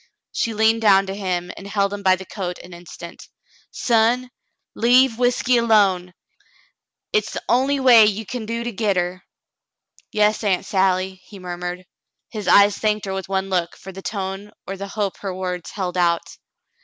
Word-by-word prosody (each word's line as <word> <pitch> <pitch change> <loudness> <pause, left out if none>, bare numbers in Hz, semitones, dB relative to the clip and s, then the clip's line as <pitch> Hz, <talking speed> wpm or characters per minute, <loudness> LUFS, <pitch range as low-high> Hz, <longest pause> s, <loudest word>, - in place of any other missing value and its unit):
She 225 -1 -2
leaned 220 +1 +3
down 195 -3 +5
to 190 - -5
him 180 -3 -3
and 200 - -10
held 200 0 0
him 205 - -5
by 190 -1 +4
the 190 +1 -10
coat 180 -3 -5
an 180 - -12
instant, 170 0 -11 0.4
"Son, 240 +2 +1 0.4
leave 245 0 +4
whiskey 245 0 +2
alone. 195 -6 +2 1.0
Hit's 215 0 0
the - - -5
only 270 +3 +2
way 240 -5 +7
you 215 +1 -2
kin 230 +1 -6
do 230 +1 -3
to 240 - -3
get 210 -2 0
her." 180 +1 -2 0.9
"Yas, 210 +1 +2
Aunt 195 -2 +1
Sally," 190 -1 0
he 205 - -12
murmured. 180 0 -6 0.5
His 210 -4 -6
eyes 200 +1 +5
thanked 215 -1 0
her 195 - -4
with 190 0 -5
one 195 0 -2
look 175 -2 -1
for 190 - -10
the 190 +1 -10
tone 195 0 -5 0.2
or 195 - -5
the 200 +1 -6
hope 200 -1 -3
her 195 -2 -5
words 180 -2 -4
held 185 -3 -4
out. 170 -1 +2
200 Hz, 175 wpm, -21 LUFS, 185-220 Hz, 1.0 s, way